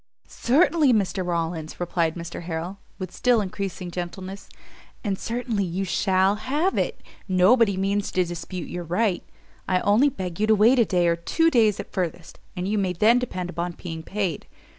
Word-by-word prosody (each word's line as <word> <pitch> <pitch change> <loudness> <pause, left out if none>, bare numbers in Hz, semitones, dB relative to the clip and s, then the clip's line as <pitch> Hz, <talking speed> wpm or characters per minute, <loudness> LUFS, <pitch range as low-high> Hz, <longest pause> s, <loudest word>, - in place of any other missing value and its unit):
"Certainly, 285 +1 +3
Mr 195 -3 0
Rawlins," 165 -2 -3
replied 170 -2 0
Mr 170 -1 -6
Harrel, 175 +3 -5 0.2
with 185 -2 -6
still 245 +2 +2
increasing 190 -2 -4
gentleness, 185 +3 -6 0.5
"and 200 -4 0
certainly 230 -3 -2
you 185 +2 -2
shall 190 +2 +2
have 295 - 0
it: - - -1 0.3
nobody 200 +2 +4
means 200 +1 0
to 185 - +2
dispute 175 0 -6
your 175 - -5
right; 180 +3 0 0.4
I 185 - +2
only 225 +8 +4
beg 185 -8 -6
you 215 - +2
to 220 - +5
wait 230 +5 +5
a 235 - +5
day, 180 -3 +2
or 170 - +3
two 325 - +1
days 220 -6 +3
at - - -7
furthest, 175 -3 -4 0.2
and 180 0 -3
you 210 +1 0
may 185 -2 0
then 220 +7 +4
depend 185 -8 -4
upon 175 +1 -3
being 165 -2 -7
paid. 190 -2 -3
190 Hz, 175 wpm, -24 LUFS, 175-215 Hz, 0.5 s, to